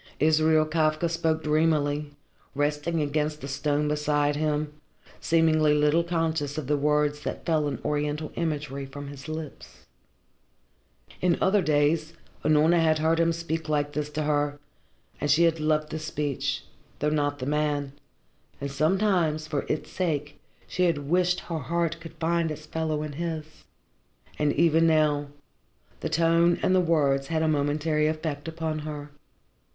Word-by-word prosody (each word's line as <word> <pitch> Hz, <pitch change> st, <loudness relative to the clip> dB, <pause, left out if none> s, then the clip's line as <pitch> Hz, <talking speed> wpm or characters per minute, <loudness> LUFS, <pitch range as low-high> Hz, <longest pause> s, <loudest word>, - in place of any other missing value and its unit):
Israel 155 Hz, 0 st, +4 dB
Kafka 155 Hz, +1 st, +1 dB
spoke 160 Hz, -1 st, 0 dB
dreamily, 150 Hz, -1 st, +1 dB, 0.4 s
resting 150 Hz, +3 st, 0 dB
against 150 Hz, +1 st, -1 dB
the 140 Hz, -, -5 dB
stone 145 Hz, +2 st, 0 dB
beside 150 Hz, -1 st, +1 dB
him, 150 Hz, 0 st, -1 dB, 0.5 s
seemingly 155 Hz, -2 st, +3 dB
little 150 Hz, +3 st, +3 dB
conscious 160 Hz, -4 st, -1 dB
of 155 Hz, -, -3 dB
the 150 Hz, +3 st, +1 dB
words 150 Hz, 0 st, +1 dB
that -, -, -5 dB
fell 155 Hz, -3 st, +1 dB
in 145 Hz, -, -2 dB
oriental 150 Hz, +1 st, -1 dB
imagery 145 Hz, -4 st, -3 dB
from 145 Hz, +1 st, -8 dB
his 140 Hz, +1 st, -10 dB
lips. 155 Hz, -2 st, -8 dB, 1.4 s
In 180 Hz, -2 st, +2 dB
other 200 Hz, +1 st, +3 dB
days 155 Hz, 0 st, +1 dB, 0.3 s
Unorna 155 Hz, +3 st, +4 dB
had 160 Hz, -1 st, +3 dB
heard 160 Hz, +1 st, +2 dB
him 165 Hz, 0 st, +3 dB
speak 165 Hz, -1 st, -3 dB
like 145 Hz, -1 st, 0 dB
this 150 Hz, 0 st, -2 dB
to 155 Hz, -, -1 dB
her, 145 Hz, -1 st, 0 dB, 0.6 s
and 145 Hz, -, -1 dB
she 155 Hz, +4 st, +5 dB
had 165 Hz, -1 st, +3 dB
loved 155 Hz, 0 st, 0 dB
the 160 Hz, -, -3 dB
speech, 150 Hz, -3 st, -2 dB, 0.3 s
though 150 Hz, -, 0 dB
not 145 Hz, -1 st, 0 dB
the 130 Hz, -, -5 dB
man, 145 Hz, -1 st, 0 dB, 0.7 s
and 140 Hz, 0 st, -4 dB
sometimes 160 Hz, 0 st, +1 dB
for 150 Hz, -3 st, -3 dB
its 155 Hz, -, -2 dB
sake 150 Hz, -5 st, -2 dB, 0.3 s
she 180 Hz, -, 0 dB
had 145 Hz, -5 st, -1 dB
wished 180 Hz, 0 st, +2 dB
her 165 Hz, -2 st, -4 dB
heart 170 Hz, +3 st, -1 dB
could 165 Hz, -1 st, -11 dB
find 170 Hz, 0 st, 0 dB
its 155 Hz, 0 st, -7 dB
fellow 155 Hz, -1 st, -2 dB
in 155 Hz, -, -5 dB
his. 160 Hz, 0 st, -4 dB, 0.9 s
And 150 Hz, -1 st, +2 dB
even 165 Hz, +1 st, +4 dB
now, 150 Hz, -2 st, +2 dB, 0.7 s
the -, -, -3 dB
tone 170 Hz, +1 st, +3 dB
and 185 Hz, -, +3 dB
the 185 Hz, -, +4 dB
words 140 Hz, -5 st, +2 dB
had 160 Hz, 0 st, 0 dB
a -, -, +2 dB
momentary 150 Hz, +1 st, +1 dB
effect 155 Hz, -1 st, -3 dB
upon 160 Hz, -1 st, -3 dB
her. 150 Hz, -1 st, -7 dB
155 Hz, 155 wpm, -26 LUFS, 145-165 Hz, 1.4 s, she